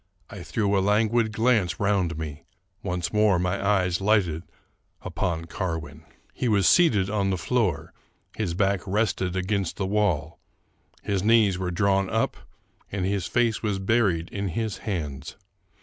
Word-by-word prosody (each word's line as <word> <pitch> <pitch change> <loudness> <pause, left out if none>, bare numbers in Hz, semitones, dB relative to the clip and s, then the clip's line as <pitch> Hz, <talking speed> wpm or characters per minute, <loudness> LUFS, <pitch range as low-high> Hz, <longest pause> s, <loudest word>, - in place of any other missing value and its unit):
I 100 - -8
threw 100 +2 0
a 95 - +3
languid 110 +3 +2
glance 110 -5 +1
round 95 -5 +1
me: 80 0 -6 0.4
once 90 -2 -3
more 105 -3 +4
my 90 +3 -1
eyes 95 -3 +1
lighted 95 -6 +2 0.6
upon 85 -1 -2
Carwin, 80 -3 -5 0.3
He 125 - -2
was 100 -5 +3
seated 110 - +4
on 100 -1 0
the 95 - 0
floor, 110 +2 -1 0.4
his 95 -6 -2
back 95 0 +1
rested 95 -3 0
against 95 0 -1
the 95 - -1
wall; 90 -6 0 0.6
his 100 -2 -1
knees 105 -3 +3
were 90 -1 -2
drawn 95 +1 +1
up, 110 0 0 0.6
and 95 -2 -2
his 95 -2 -1
face 120 -3 +1
was 105 -3 -1
buried 95 -4 +1
in 100 -1 -3
his 110 +3 -3
hands. 75 -8 -4
95 Hz, 150 wpm, -25 LUFS, 90-105 Hz, 0.6 s, more